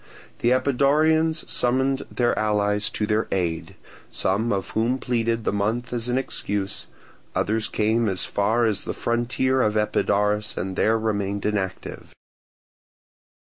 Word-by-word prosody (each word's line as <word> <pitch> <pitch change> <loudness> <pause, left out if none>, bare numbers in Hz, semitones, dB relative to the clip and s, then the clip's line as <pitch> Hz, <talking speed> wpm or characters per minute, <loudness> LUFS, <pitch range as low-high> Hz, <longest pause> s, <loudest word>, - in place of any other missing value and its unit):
The 120 - +2
Epidaurians 150 +5 +2
summoned 130 +2 +1
their 120 -1 +1
allies 105 -1 +1
to 105 - -2
their 105 +1 0
aid, 85 -4 -2 0.3
some 105 +5 0
of 95 -1 -2
whom 115 +4 +1
pleaded 115 -3 -1
the - - 0
month 110 +5 -1
as 120 0 -2
an 125 - +1
excuse; 100 -6 -3 0.5
others 110 +1 0
came 110 +1 +1
as 95 -1 0
far 110 +4 +1
as 105 -3 -1
the - - -4
frontier 125 +3 0
of 105 -2 +1
Epidaurus 105 0 +1
and 95 +1 -3
there 110 +3 +3
remained 100 -2 -2
inactive. 100 -3 -3
110 Hz, 135 wpm, -24 LUFS, 105-125 Hz, 0.5 s, there